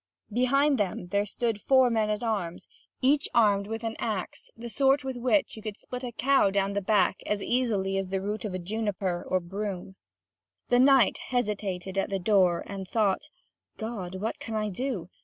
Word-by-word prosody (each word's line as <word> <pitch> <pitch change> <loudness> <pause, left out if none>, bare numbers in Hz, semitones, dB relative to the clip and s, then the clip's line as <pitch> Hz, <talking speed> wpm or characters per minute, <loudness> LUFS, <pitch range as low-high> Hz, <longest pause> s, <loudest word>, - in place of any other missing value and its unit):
Behind 275 +3 +3
them 180 -3 -2
there 200 +2 +1
stood 225 0 -2
four 260 -2 +4
men 220 -2 +1
at 210 +2 -1
arms, 200 -7 -2 0.4
each 285 +3 +3
armed 205 -4 +4
with 225 +1 -5
an 225 0 -3
axe 210 -5 -4
the 235 +1 -7
sort 270 +3 +2
with 265 -1 -4
which 255 +5 +1
you 220 - -9
could 215 -1 -6
split 250 +1 -7
a 245 - -4
cow 270 -3 +3
down 195 0 0
the 200 - -1
back 195 -2 +2
as 205 -1 -1
easily 205 -6 0
as 190 -1 -5
a 195 - 0
root 205 +3 -3
of 185 -4 -4
juniper 200 -3 -2
or 185 - +2
broom. 190 +1 -5 0.7
The 245 - +4
knight 265 -4 +5
hesitated 200 -6 -2
at - - -1
the 195 - 0
door, 185 -3 +3
and 195 -2 -6
thought: 205 -2 +1 0.5
"God, 210 -5 -5
what 210 +4 -3
can 225 - -5
I 215 -1 0
do? 200 -4 -4
210 Hz, 185 wpm, -28 LUFS, 195-240 Hz, 0.7 s, knight